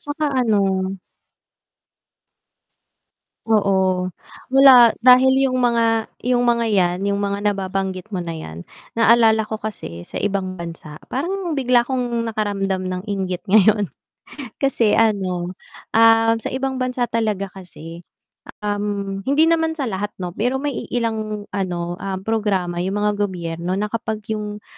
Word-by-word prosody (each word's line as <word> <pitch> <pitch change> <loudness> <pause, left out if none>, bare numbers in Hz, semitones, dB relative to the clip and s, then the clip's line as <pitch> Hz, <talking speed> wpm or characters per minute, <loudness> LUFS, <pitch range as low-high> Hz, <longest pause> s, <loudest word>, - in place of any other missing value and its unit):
tsaka 295 +2 -4 0.2
ano 195 -4 +1 2.5
Oo. 215 -3 +2 0.8
Wala. 260 -3 +8
Dahil 260 +2 +5
yung 255 - -2
mga 230 -2 +1 0.2
yung 245 -1 +2
mga 235 -1 +2
yan 180 -5 +1
yung 200 0 0
mga 200 +1 -2
nababanggit 195 0 -2
mo 195 - -3
na 170 -2 -4
yan, 85 - -8 0.3
naalala 225 -1 +4
ko 220 - -5
kasi 205 - -6
sa - - -7
ibang 195 -2 -2
bansa 165 -3 -8
parang 350 +4 -3
bigla 250 -3 +2
kong 240 -3 -2
nakaramdam 200 -3 -2
ng 180 0 -4
inggit 190 -2 -3
ngayon. 210 +1 +4 0.7
Kasi 245 -6 +2
ano, 185 -5 0 0.4
ah, 225 0 +5
sa 225 - -5
ibang 265 0 -2
bansa 250 -1 -1
talaga 215 -4 -1
kasi, 175 -3 -11 0.6
um, 205 -1 -2
hindi 290 +3 +4
naman 325 -1 +1
sa 285 - -2
lahat 205 -2 -4
no, 180 -2 -5
pero 245 +8 -1
may 285 +2 -2 0.2
iilang 220 -3 -2
ano, 175 -2 -3
um, 195 -1 -3
programa 195 -6 -1
yung 190 +3 -2
mga 210 - +2
gobyerno 175 -2 -2
na 205 - -1
kapag 220 -2 -3
yung, 210 -1 -5
210 Hz, 135 wpm, -20 LUFS, 190-235 Hz, 2.5 s, Wala